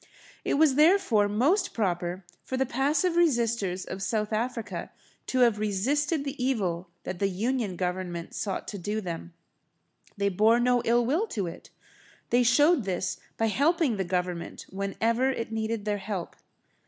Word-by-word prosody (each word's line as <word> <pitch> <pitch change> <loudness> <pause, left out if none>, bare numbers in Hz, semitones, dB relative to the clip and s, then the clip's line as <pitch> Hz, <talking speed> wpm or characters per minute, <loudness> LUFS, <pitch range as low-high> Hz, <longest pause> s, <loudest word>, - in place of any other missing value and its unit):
It - - 0
was, 295 -1 +5
therefore, 300 - +4
most 290 - +1
proper 180 -3 -1 0.2
for 260 - -3
the 265 - +2
passive 290 +7 +1
resisters 235 - +1
of 190 - -6
South 210 +2 -1
Africa 230 0 -3 0.4
to 255 - +1
have 230 -4 +4
resisted 280 - 0
the 275 -2 -4
evil 185 -9 -1
that 180 - -5
the 195 - +2
Union 215 +1 -1
Government 180 -1 -3
sought 200 - -3
to 205 - -6
do 205 +4 -3
to 220 - -1
them. 170 -2 -6 0.8
They 200 0 +1
bore 215 +5 +4
no 245 0 +3
ill 240 +1 +3
will 325 - +1
to 205 - -2
it. 170 - -8 0.6
They 245 - +5
showed 290 +5 +4
this 190 0 -2 0.2
by 225 - +1
helping 285 - +2
the 190 - 0
Government 180 -1 -3
whenever 225 +6 0
it 230 -4 -3
needed 220 -1 -2
their 205 -1 -1
help. 195 -3 -5
220 Hz, 160 wpm, -27 LUFS, 190-260 Hz, 0.8 s, was